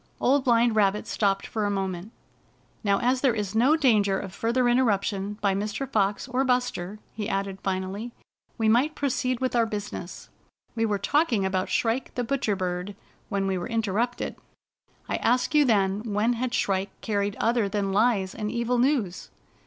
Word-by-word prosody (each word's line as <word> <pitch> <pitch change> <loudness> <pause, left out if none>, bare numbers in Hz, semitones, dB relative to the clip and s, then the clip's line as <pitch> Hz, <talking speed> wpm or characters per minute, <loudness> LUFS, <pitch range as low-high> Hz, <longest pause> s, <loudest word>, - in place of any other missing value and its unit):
Old 270 +1 +3
Blind 235 -2 +3
Rabbit 205 -1 +2
stopped 195 -2 0
for 220 - -3
a 205 - +1
mcment. 190 -1 -3 0.7
"Now, 200 -2 +3
as 255 +1 +2
there 255 -5 +3
is 205 -2 -3
no 250 +8 +4
danger 215 -10 +3
of 190 -2 -7
further 240 +4 +1
inter 245 +2 +4
ruption 205 -1 -1
by 200 -2 +2
Mr. 210 +7 -3
Fox 205 0 0
or 255 +1 0
Buster," 245 -7 -1 0.2
he 215 0 -4
added 195 0 -2
jSnally, 190 +4 -3 0.2
" - - -43
we 225 - +1
might 255 +8 +3
proceed 255 -3 -1
with 255 -1 -1
our 230 -1 +3
business. 205 -4 -6 0.4
We 225 -1 0
were 205 -1 0
talking 230 - +1
about 185 -1 -1
Shrike 235 +3 -1
the 245 - -1
Butcher 235 -4 0
Bird 180 +1 -3 0.3
when 195 -1 -1
we 190 -1 0
were 175 - -5
interrupted. 225 +2 -1 0.7
I - - -1
asked 250 +5 +1
you 300 -1 +5
then 200 -4 +2
when 215 +4 +2
had 245 +1 -2
Shrike 195 -4 -1
carried 205 -1 -1
other 230 -3 +1
than 200 -1 -1
lies 200 -3 +2
and 210 -2 -3
evil 240 +1 0
news." 245 -9 0
215 Hz, 175 wpm, -26 LUFS, 195-245 Hz, 0.7 s, you